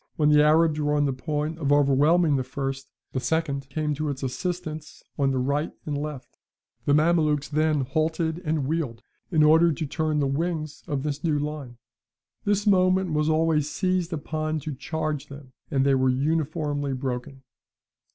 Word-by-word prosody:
When 150 -1 +3
the 150 0 +6
Arabs 155 0 +4
were 150 0 +1
on 145 0 +2
the 135 - 0
point 150 +4 -3
of 145 -3 0
overwhelming 145 +3 +4
the 130 - 0
first, 135 +1 -4 0.2
the 130 - -2
second 140 0 -1
came 150 +2 -1
to 150 +1 -2
its 140 -1 -5
assistance 155 +2 -4
on 140 -1 +1
the 135 - 0
right 140 +4 0
and 150 - -2
left; 145 -2 -6 0.5
the 145 - +3
Mamelukes 155 -2 +2
then 155 -1 +1
halted 160 +4 -1
and 155 -4 0
wheeled, 135 -7 -2 0.3
in 160 -4 +3
order 160 +2 +6
to 155 +1 -3
turn 155 +1 -1
the 145 - +2
wings 155 +2 -2
of 140 -4 -2
this 150 -1 -3
new 155 -3 +1
line; 145 -4 -5 0.7
this 205 0 +1
moment 185 -3 +3
was 150 +1 +1
always 155 -2 +2
seized 185 -1 -1
upon 155 0 -2
to 155 0 -5
charge 155 +1 -3
them, 140 -2 -12 0.2
and 135 -1 +1
they 140 - +4
were 130 -1 +3
uniformly 145 0 -1
broken." 130 0 -4
150 Hz, 170 wpm, -25 LUFS, 140-160 Hz, 0.7 s, the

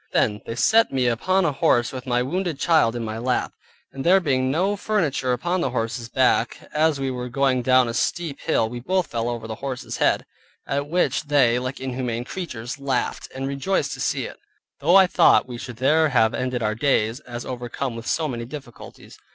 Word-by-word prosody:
Then 105 0 +1
they 115 - -4
set 225 - +4
me 130 -2 0
upon 180 +11 +1
a 160 - +2
horse 120 -3 +2
with 130 0 -7
my 125 0 +1
wounded 175 +3 -2
child 155 -8 +3
in 120 -1 -3
my 110 +1 -4
lap, 125 +1 -1 0.4
and 135 - -5
there 185 +3 +5
being 130 -6 0
no 185 +8 +1
furniture 165 -11 0
upon 175 +9 0
the 135 - 0
horse's 115 -1 -3
back, 130 0 +2 0.2
as 155 -1 +2
we 135 -1 -1
were 125 -1 -5
going 130 0 +1
down 130 0 +4
a 115 - -3
steep 155 +3 -2
hill 135 -8 +1
we 120 +2 -6
both 185 +8 0
fell 115 -3 -2
over 120 -2 -4
the 110 - -4
horse's 135 -2 -4
head, - - +2 0.4
at 140 +1 -2
which 175 -2 +1
they, 130 -5 +3
like 130 +1 -5
inhumane 125 -2 -3
creatures, 130 -5 -6
laughed, 135 -3 -2
and 135 +1 -3
rejoiced 140 +8 -1
to - - -6
see - - -1
it, - - -9 0.4
though 165 +6 +3
I 195 -1 +8
thought 180 - +4
we 120 -2 -7
should 120 -2 -8
there 155 +5 +3
have 115 -5 +3
ended 125 -2 -2
our 105 0 +1
days, 115 -1 +1
as 120 -4 -8
overcome 125 0 -4
with 115 +1 -8
so 160 -1 0
many 120 -4 -4
difficulties. 130 -2 -11
130 Hz, 205 wpm, -23 LUFS, 120-150 Hz, 0.4 s, I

